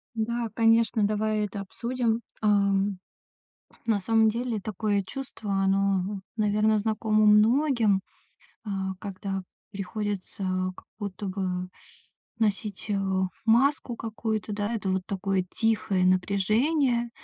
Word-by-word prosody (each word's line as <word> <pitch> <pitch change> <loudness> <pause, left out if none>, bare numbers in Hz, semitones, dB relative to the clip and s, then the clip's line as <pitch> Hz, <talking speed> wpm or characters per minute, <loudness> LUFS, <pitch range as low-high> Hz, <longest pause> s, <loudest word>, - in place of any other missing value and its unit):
Да, 230 +1 -1
конечно, 225 -1 +3
давай 215 0 0
это 200 0 -6
обсудим. 235 +3 -1 0.2
Ам, 200 -2 +2 0.9
на 220 -3 +3
самом 220 +2 +3
деле 235 -1 -1
такое 205 0 -1
чувство, 220 -2 -6
оно, 195 0 +1 0.2
наверно, 215 0 +2
знакомо 215 0 +1
многим, 220 -1 +4 0.7
а, 195 -2 -2
когда 195 -1 -4 0.3
приходится 200 0 -4 0.3
как - - -14
будто 200 0 -5
бы 185 -1 -2 0.7
носить, 210 -2 -1
э, 200 - +1 0.5
маску 245 +2 +3
какую-то, 220 -1 -3
да, 205 +2 -2
это 200 -3 -2
вот 185 0 0
такое 195 -1 -1
тихое 215 -4 +1
напряжение. 235 - +2
210 Hz, 110 wpm, -27 LUFS, 195-225 Hz, 0.9 s, многим